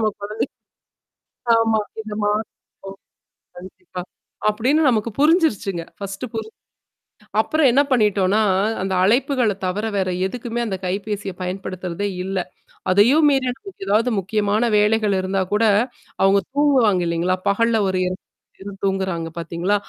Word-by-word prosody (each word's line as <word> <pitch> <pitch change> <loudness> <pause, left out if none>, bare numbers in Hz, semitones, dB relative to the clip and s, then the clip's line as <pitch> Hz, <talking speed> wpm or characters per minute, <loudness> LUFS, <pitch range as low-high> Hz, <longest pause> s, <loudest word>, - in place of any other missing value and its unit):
நம்ம 220 - +2
குழந்தை 210 +2 -2 1.1
ஆமா 225 -1 +2 0.2
இதமா. 210 -1 -2 0.6
ஓ! 195 - -6 0.7
கண்டிப்பா. 185 0 -9 0.5
அப்டின்னு 260 +9 +2
நமக்கு 230 -1 +1
புரிஞ்சிருச்சுங்க. 280 - +2
ஃபர்ஸ்ட்டு 200 +4 -6
புரிஞ்சு 220 0 -5 0.9
அப்புறம் 310 -3 +2
என்ன 275 +3 +5
பண்ணிட்டோனா, 210 -3 +3 0.4
அந்த 190 0 -2
அழைப்புகள 245 0 +2
தவிர 200 +4 -2
வேற 185 -1 0 0.2
எதுக்குமே 240 +2 -4
அந்த 190 -2 -3
கைபேசிய 200 +1 -3
பயன்படுத்துறதே 185 0 -4 0.2
இல்ல. 190 0 -3 0.5
அதையும் 255 +11 +5
மீறி 270 -2 +2
நமக்கு 370 - -10
எதாவது 220 +5 +3
முக்கியமான 205 +3 0
வேலைகள் 210 -1 +2
இருந்தா 190 +1 -1
கூட, 220 +2 +3 0.6
அவங்க 195 +1 +5 0.2
தூங்குவாங்க 255 -11 +3
இல்லைங்களா? 170 +2 +1
பகல்ல 225 +1 +2
ஒரு 185 -1 0
2 185 +1 -3 0.3
மணி - - -16
நேரம் 195 -1 -9
தூங்குறாங்க 190 -4 -1
பார்த்தீங்களா? 170 +4 -1
205 Hz, 125 wpm, -21 LUFS, 190-230 Hz, 1.1 s, என்ன